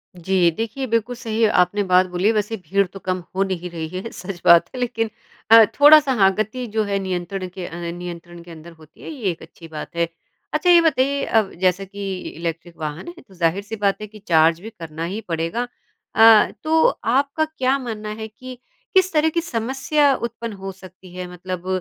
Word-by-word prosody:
जी। 180 0 +2
देखिए, 230 +4 -3
बिल्कुल 230 +2 -1
सही 225 -2 -2 0.2
आपने 205 +3 0
बात 185 -1 +4
बोली 180 +3 0
है। 225 - +4
वैसे 215 +1 -1
भीड़ 195 +2 0
तो 195 +2 -11
कम 185 -1 -3
हो 195 - +2
नहीं 180 -2 -4
रही 165 -2 -5
है, 230 - -7
सच 180 -1 -8
बात 170 -1 +6
है। - - -5
लेकिन 225 -2 -1 0.4
अ, 225 0 +10 0.2
थोड़ा-सा 295 -1 +8
हाँ, 195 -1 +6
गति 220 +4 -3
जो 220 - +2
है 200 -1 -1
नियंत्रण 185 0 -4
के 180 0 -8
अ, - - -9 0.2
नियंत्रण 175 0 -8
के 175 - -13
अंदर 165 +1 -11
होती 155 -1 -19
है, - - -8
ये 255 -11 -3
एक 165 - -10
अच्छी 165 - -13
बात 155 +1 -8
है। 170 0 +1 0.5
अच्छा, 305 +4 +1
ये 350 -1 +8
बताइए, 280 -3 +1
अब 220 -3 +1
जैसा 185 +1 +2
कि 195 -1 -5
इलेक्ट्रिक 165 +1 -6
वाहन 155 - -5
है, 345 0 -10
तो 195 - -18
ज़ाहिर-सी 185 +5 -1
बात 200 -2 +1
है 215 - -5
कि 215 +1 -14
चार्ज 165 0 +4
भी 220 - -8
करना 165 -6 -8
ही 195 +5 -4
पड़ेगा। 165 +9 -2 0.5
अ, 225 -1 +7
तो 320 0 +3 0.2
आपका 280 +5 +1
क्या 275 -4 0
मानना 220 -4 -6
है 220 - -4
कि 255 +4 -11 0.4
किस 375 0 +4
तरह 310 0 +3
की 335 +2 -1
समस्या 270 +1 +1
उत्पन्न 235 -2 -5
हो 195 -1 -7
सकती 185 -1 -15
है? 180 0 -5
मतलब 180 0 -6
200 Hz, 205 wpm, -21 LUFS, 175-235 Hz, 0.5 s, अ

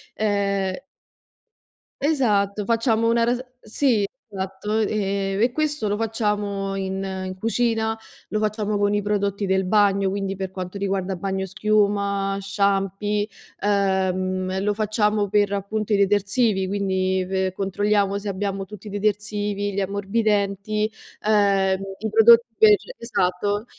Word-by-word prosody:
ehm 200 -2 0 1.3
Esatto, 210 -9 +1
facciamo 230 0 +2
una 230 0 +3
ras 240 +1 +1 0.2
sì, 220 -1 +1 0.2
esatto, 195 +2 -3
e 200 -2 -1
e 240 +2 +3
questo 295 -4 -1
lo 205 - 0
facciamo 210 -3 -1
in 190 0 -3 0.2
in 185 0 -5
cucina, 225 0 0 0.3
lo 215 - -1
facciamo 215 -1 -1
con 205 0 +1
i 205 - +1
prodotti 200 0 -1
del 190 0 +1
bagno, 200 0 +3
quindi 195 0 -2
per 190 -1 -5
quanto 185 +1 -6
riguarda 195 -1 -1
bagnoschiuma, 200 +1 0
shampi, 200 +1 0 0.3
ehm, 190 -2 0
lo 210 0 +1
facciamo 210 -1 0
per 205 0 +2
appunto 210 +2 -2
i - - +4
detersivi, 200 0 +2
quindi 190 -1 0
pe 190 -1 -1
controlliamo 200 +1 0
se 200 +1 -6
abbiamo 195 0 -2
tutti 210 +1 -11
i - - -5
detersivi, 205 0 -1
gli 195 - -1
ammorbidenti, 200 +1 0 0.3
uhm, 195 -2 +3 0.2
i 220 +2 -2
prodotti 225 +2 +7 0.2
per 215 -1 +7 0.2
esatto 205 -2 -1
200 Hz, 125 wpm, -23 LUFS, 195-215 Hz, 1.3 s, prodotti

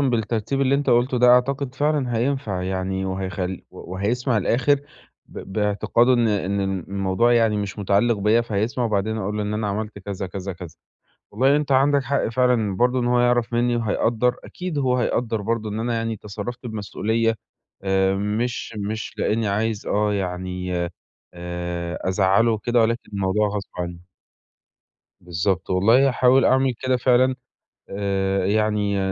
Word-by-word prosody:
بالترتيب 120 0 0
اللي 135 0 +3
أنت 145 +1 +1
قُلته 125 +2 +2
ده، 125 +1 +5
أعتقد 130 +1 +2
فعلًا 145 -5 0
هينفع 115 -6 -1
يعني 95 +1 -2
وهيخل 95 -1 -3
و 90 - -10
وهيسمع 115 +6 0
الآخِر 135 +7 +2 0.5
ب - - -10
باعتقاد 105 +3 +1
إن 120 -3 +4
إن 100 -1 0
الم 95 -1 -1
الموضوع 95 +4 +1
يعني 115 -3 +3
مش 100 0 -4
متعلّق 105 +4 +2
بيّا 105 +3 +3
فهيسمع 115 +2 -1
وبعدين 110 0 0
أقول 105 +1 -3
له 105 - -1
إن 105 +1 -2
أنا 105 0 -1
عملت 105 +1 -4
كذا، 100 -1 -5
كذا، 95 +1 -5
كذا 90 -3 -10 0.5
وبعدين 135 +7 +3
أنت 150 -2 -1
عندك 140 +1 +4
حق 135 -1 0
فعلًا 115 -4 +1
برضه 125 +4 +2
إن 120 - -1
هو 120 0 +3
يعرف 120 -1 +2
منّي 120 0 +1
وهيقدّر. 115 +2 +1
أكيد 180 -4 -5
هو 130 -2 +1
هيقدّر 115 -2 0
برضه 110 +1 -2
إن 110 +2 -3
أنا 120 0 -1
يعني 115 -1 -2
تصرّفت 105 +5 -7
بمسؤولية 110 +1 -1 0.5
آآ 95 0 +2
مش 110 +4 -2
مش 105 +2 -4
لإنّي 110 0 0
عايز 105 +1 -1
آه، 105 0 +1
يعني 90 -1 -3 0.6
آآ 85 0 -4
أزعّله 95 +4 +3
وكده 120 +3 +1
ولكن 115 +1 0
الموضوع 100 +1 +1
غصب 100 -1 -4
عنّي. 90 0 -6 1.1
بالضبط. 90 +2 -2
والله 115 +9 +4
هاحاول 130 0 +4
أعمل 130 0 +3
كده 130 -1 +1
فعلًا. 130 +1 +3 0.5
آآ 95 -1 -1
يعني 105 -1 +1
110 Hz, 155 wpm, -23 LUFS, 95-120 Hz, 1.1 s, ده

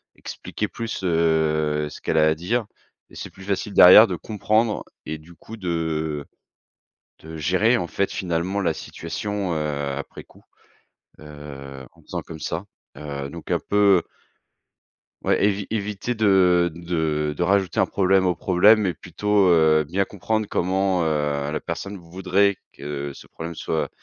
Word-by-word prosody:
expliquer - - -5
plus, 115 -4 -5
heu, 80 -3 +1
ce - - -11
qu'elle - - -1
a 80 0 +5
à 80 - +2
dire 105 +9 -1 0.4
et - - -17
c'est - - -7
plus 95 - -14
facile 100 +1 -2
derrière 95 +5 +10
de - - -3
comprendre 110 +1 0 0.2
et 80 - -4
du 80 +3 -16
coup 110 +7 -11
de 80 -5 -2 1.0
de 80 0 -9
gérer 95 +10 +2
en 90 - -2
fait 100 +3 -1
finalement 90 +2 -2
la 85 - +1
situation, 95 +4 -4
heu, 75 -3 -2
après 70 - -9
coup. - - -21 0.8
Heu, 70 -3 -10
en - - -22
faisant - - -5
comme 80 - -10
ça, 80 +5 -4 0.3
heu, 70 -2 -5
donc 85 +2 -10
un - - +2
peu 100 -3 +4 1.2
Ouais, - - +2
évi 100 -1 +1
éviter 105 +2 -2
de 95 -5 +4
de 80 -3 -1
de 85 - -1
rajouter 95 -1 +1
un - - +5
problème 95 -1 +2
au 90 - +1
problème, 100 +6 +4
mais 90 -4 0
plutôt, 95 +4 +1
heu, 80 -2 +4
bien 95 +6 -1
comprendre 110 +2 -2
comment, 95 0 0
heu, 75 -2 -1
la 75 - -2
personne 100 +4 -5
voudrait 95 +3 0 0.2
que 70 0 -5
ce - - -13
problème 85 0 -8
soit 80 0 -2
85 Hz, 155 wpm, -23 LUFS, 80-100 Hz, 1.2 s, derrière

